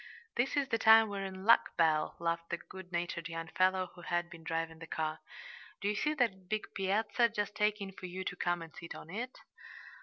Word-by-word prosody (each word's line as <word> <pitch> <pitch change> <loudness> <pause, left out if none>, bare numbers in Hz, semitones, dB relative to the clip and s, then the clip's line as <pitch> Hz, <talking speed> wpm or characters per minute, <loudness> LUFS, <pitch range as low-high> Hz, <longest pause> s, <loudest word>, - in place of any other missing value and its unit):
"This 265 +4 +1
is 275 -1 +1
the 225 - +1
time 220 0 +8
we're 200 -1 -3
in 190 0 -6
luck, 230 - +5
Belle," 155 -2 +3
laughed 170 0 -1
the 170 - -1
good 185 +1 -11
natured 170 -1 -2
young 165 0 -5
fellow 185 0 +2
who 175 - -12
had 175 0 -1
been 165 -2 -11
driving 165 0 -2
the 165 - -9
car. 155 -1 -2 0.6
"Do 200 - -2
you 210 - +1
see 300 +8 +1
that 195 -9 0
big 215 0 -2
piazza 215 +5 +2
just 205 -1 -3
aching 210 -2 +1
for 185 -1 -8
you 185 +1 -5
to 180 - -3
come 175 -1 0
and 165 - -12
sit 170 -1 -8
on 165 - -10
it?" 245 +6 -4
185 Hz, 215 wpm, -33 LUFS, 170-210 Hz, 0.6 s, time